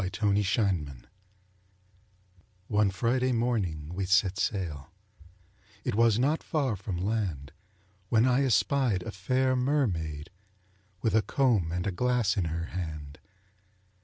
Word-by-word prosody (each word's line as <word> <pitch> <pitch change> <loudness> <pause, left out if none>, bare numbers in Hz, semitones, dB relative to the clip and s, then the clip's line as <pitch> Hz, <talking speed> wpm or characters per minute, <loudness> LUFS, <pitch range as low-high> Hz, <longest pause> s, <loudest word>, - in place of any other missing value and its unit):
THE 95 +3 -3
MERMAID 95 - 0 1.6
One 105 -2 +3
Friday 125 +6 0
morning 100 -11 -1
we 95 +1 -2
set 95 0 +2
sail 80 -9 -2 0.9
It 125 - -2
was 115 0 +4
not 145 +6 +1
far 140 -8 -1
from 95 -1 -5
land, 90 -8 -2 0.6
When 115 +1 +4
I 130 +2 +3
espied 125 -4 +2
a - - -5
fair 130 +7 0
mermaid, 90 - -1 0.7
With 110 - +1
a 110 - +5
comb 110 -11 +1
and 90 +1 -2
a 100 - 0
glass 125 +1 +1
in 95 - 0
her 85 +1 -3
hand. 75 -5 -6
100 Hz, 125 wpm, -28 LUFS, 85-125 Hz, 1.6 s, a